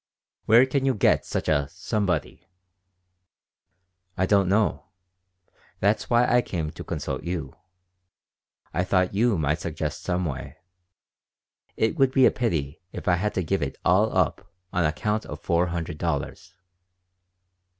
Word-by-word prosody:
"Where 115 +4 +6
can 135 +1 -1
you 135 -1 +2
get 105 - +2
such - - -3
a 70 -2 +1
'somebody'?" 95 +3 -2 1.7
"I 95 - +2
don't 100 -1 +3
know. 105 +2 +1 0.9
That's 100 +3 +1
why 120 0 +4
I 120 0 +4
came 80 -8 -4
to - - -9
consult - - -4
you. 85 -2 -4 1.2
I 90 - +1
thought 90 0 +1
you 110 0 +2
might 75 0 0
suggest 80 0 -4
some 90 0 -1
way. 70 -1 -5 1.2
It 110 +8 +1
would 135 -2 +4
be 130 -2 +6
a - - +6
pity 80 - -2
if - - -8
I 90 -1 +4
had 105 +4 -2
to 95 - 0
give 95 +4 -1
it 70 -2 -3
all - - +3
up - - 0 0.3
on 90 -2 +2
account 105 +8 -1
of - - -7
four 85 0 +1
hundred 85 -3 -4
dollars." 85 +4 -3
90 Hz, 145 wpm, -25 LUFS, 80-105 Hz, 1.7 s, Where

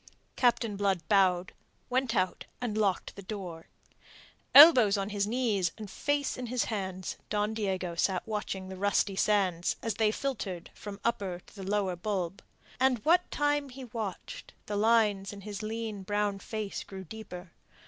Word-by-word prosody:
Captain 235 -4 +2
Blood 195 -5 0
bowed, 185 -3 +3 0.3
went 255 -2 0
out, 185 -2 0
and 240 -4 -2
locked 200 -4 0
the 200 - -8
door. 185 -5 -7 0.9
Elbows 255 -9 +10
on 195 +1 -2
his 205 -1 -1
knees 215 -7 +1
and 215 -3 -8
face 290 -1 -1
in 250 -1 -4
his 245 +1 0
hands, 190 -4 -4
Don 210 +1 0
Diego 190 -5 -2
sat 180 +2 0
watching 205 -3 -3
the 190 0 -7
rusty 200 0 +1
sands 190 -4 +2
as 225 - 0
they 215 +1 +2
filtered 210 -9 -4
from 205 -1 -8
the 200 - -19
upper 195 -6 -1
to - - -19
the 200 - -8
lower 200 -3 +1
bulb. 185 -1 -3 0.4
And 260 -1 +4
what 350 +3 +4
time 290 -1 0
he 265 +1 -9
watched, 215 -5 -6
the 210 - -3
lines 210 -3 +3
in 200 -1 -9
his 205 0 -6
lean 220 -1 -4
brown 205 +1 -1
face 215 -1 -4
grew 190 -1 -8
deeper. 180 -3 -9
205 Hz, 165 wpm, -30 LUFS, 190-225 Hz, 0.9 s, Elbows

